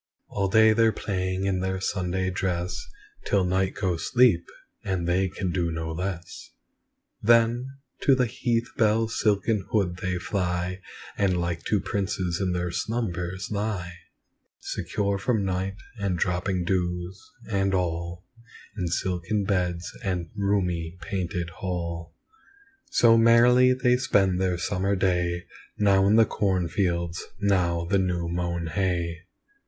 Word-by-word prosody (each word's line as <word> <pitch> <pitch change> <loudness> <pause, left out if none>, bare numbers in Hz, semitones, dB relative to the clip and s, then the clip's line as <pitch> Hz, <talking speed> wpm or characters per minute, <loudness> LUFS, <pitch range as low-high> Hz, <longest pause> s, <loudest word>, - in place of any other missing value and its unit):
All 100 -1 0
day 110 +2 +5
they're 115 0 +4
playing 95 -2 -2
in 95 -1 +1
their 95 0 -2
Sunday 95 -1 -1
dress 90 -1 -2 0.4
Till 100 -2 +2
night 95 +1 0
goes 90 -4 -1
sleep, 120 -9 +4 0.4
and 95 -3 -2
they 95 +2 +2
can 95 0 -3
do 85 -2 0
no 80 0 -3
less; 90 +1 -5 0.7
Then, 115 +2 +4 0.3
to 135 - +5
the 130 -1 +2
heath 120 0 -1
bell's 110 0 +2
silken 105 0 +2
hood 95 -5 +1
they 90 0 -2
fly, 90 0 -2 0.4
And 95 -3 +2
like 85 -1 -2
to 105 - +2
princes 95 -3 -2
in 95 -2 0
their 90 -1 -2
slumbers 95 -3 -3
lie, 100 -4 -2 0.7
Secure 100 -1 -2
from 110 -1 0
night, 95 +1 -2 0.2
and 100 -3 -1
dropping 90 +1 0
dews, 90 0 -2 0.3
and 100 -2 +1
all, 85 0 -2 0.5
In 90 -5 -2
silken 90 +4 -1
beds 90 -3 -1
and 90 -4 -2
roomy 90 -4 -1
painted 90 -1 -3
hall. 85 -1 -4 0.7
So 115 -1 +5
merrily 120 +2 +6
they 125 -1 +3
spend 95 -7 +2
their 90 -2 +1
summer 95 +2 0
day, 90 -2 0 0.3
Now 100 -1 +4
in 105 - +5
the 115 0 +6
cornfields, 85 -3 -1 0.2
now 90 -4 +1
the 100 +3 +2
new 90 -2 -1
mown 85 0 -2
hay. 85 -1 -2
95 Hz, 135 wpm, -26 LUFS, 90-100 Hz, 0.7 s, merrily